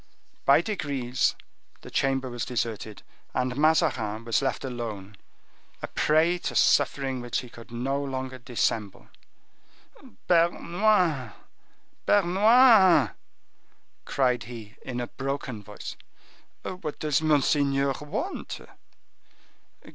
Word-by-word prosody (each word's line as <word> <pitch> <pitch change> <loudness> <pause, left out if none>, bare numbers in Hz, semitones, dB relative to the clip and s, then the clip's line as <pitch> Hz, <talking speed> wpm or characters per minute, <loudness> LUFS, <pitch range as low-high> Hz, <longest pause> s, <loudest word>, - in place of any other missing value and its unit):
By - - +6
degrees 140 - -1 0.5
the - - -11
chamber 135 -1 0
was 120 -1 -4
deserted, 110 -3 -4 0.3
and 125 0 0
Mazarin 120 -8 +1
was 115 +2 +1
left 135 - -2
alone, 110 -6 -6 0.7
a - - -2
prey 165 +3 +2
to - - -4
suffering 135 -2 +2
which 120 -1 -2
he 125 - -11
could 115 0 -13
no 135 +4 -2
longer 130 -1 -5
dissemble. 115 -4 -2 1.2
"Bernouin! 170 - +2 0.7
Bernouin!" 200 - +6 0.9
cried 125 -4 +1
he 115 -2 -10
in 125 -1 -5
a 120 - -2
broken 135 -3 -5
voice. 105 0 -8 0.7
"What 175 -5 -5
does 150 -1 +1
monseigneur 140 -2 +2
want?" 210 - -4
135 Hz, 100 wpm, -26 LUFS, 120-160 Hz, 1.2 s, By